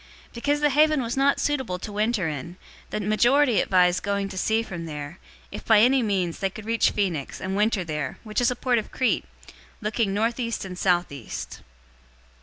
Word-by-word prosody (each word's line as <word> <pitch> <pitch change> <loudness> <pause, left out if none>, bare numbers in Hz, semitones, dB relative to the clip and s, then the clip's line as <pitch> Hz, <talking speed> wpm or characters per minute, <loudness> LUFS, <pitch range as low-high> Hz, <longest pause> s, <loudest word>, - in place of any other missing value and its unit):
027:012 - - -30
Because 290 +5 0
the 295 - +4
haven 305 +1 +4
was 235 +1 -3
not 275 +1 +2
suitable 265 -11 -1
to 210 +4 -7
winter 210 -2 0
in, 160 +4 -6 0.3
the - - -3
majority 240 +4 +3
advised 180 -2 +3
going 200 0 -1
to 195 - -8
sea 220 +4 +1
from 175 -6 -7
there, 150 +2 -7 0.3
if - - -7
by 220 -2 +5
any 255 +4 +5
means 190 -6 -1
they 195 - 0
could 210 +2 -10
reach 230 0 +2
Phoenix, 175 -9 -2
and 190 +1 -3
winter 210 -1 +1
there, 150 -5 -4
which 215 +1 -2
is 245 - +3
a 250 - -2
port 245 -1 +1
of 215 - -7
Crete, 255 -2 0 0.5
looking 215 -1 -1
northeast 230 +2 -1
and 185 -1 -7
southeast. 175 - -2
210 Hz, 190 wpm, -25 LUFS, 180-240 Hz, 0.5 s, by